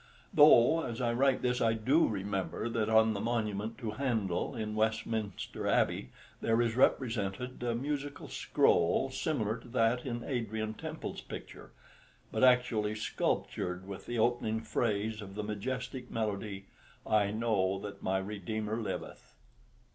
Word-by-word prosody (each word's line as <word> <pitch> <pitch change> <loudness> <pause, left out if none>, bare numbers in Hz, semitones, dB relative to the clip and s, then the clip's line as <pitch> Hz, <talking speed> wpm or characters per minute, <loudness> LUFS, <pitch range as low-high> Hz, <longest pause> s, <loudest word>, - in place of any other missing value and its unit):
Though, 150 +1 +7
as 115 -1 -4
I 120 -2 +1
write 135 +2 +2
this, 125 0 +1
I 115 -1 +3
do 130 +9 +3
remember 100 +1 -2
that 115 -2 0
on 110 0 +5
the 100 - -3
monument 110 -2 -2
to 115 -4 -4
Handel 110 -4 -1
in 110 -2 -3
Westminster 110 -1 -2
Abbey 65 - +1 0.3
there 115 0 +2
is 115 -2 +1
represented 125 -2 +1
a 120 -1 0
musical 140 +2 -3
scroll 85 +10 +2
similar 120 -7 -1
to 120 - -15
that 120 0 +2
in 120 -2 -4
Adrian 110 -4 -2
Temple's - - -6
picture, - - -9 0.6
but - - 0
actually 125 -4 +4
sculptured 90 -3 -2
with 100 -1 -8
the 120 - -2
opening 110 -1 +1
phrase 110 -1 -1
of 95 -1 -9
the 105 - -3
majestic 125 +4 -4
melody, 100 -2 -3 0.4
"I 105 -2 +3
know 105 -3 +1
that 100 +1 -8
my 95 +1 +1
Redeemer 105 +2 -3
liveth." 100 -4 -6
110 Hz, 140 wpm, -32 LUFS, 105-120 Hz, 0.6 s, Though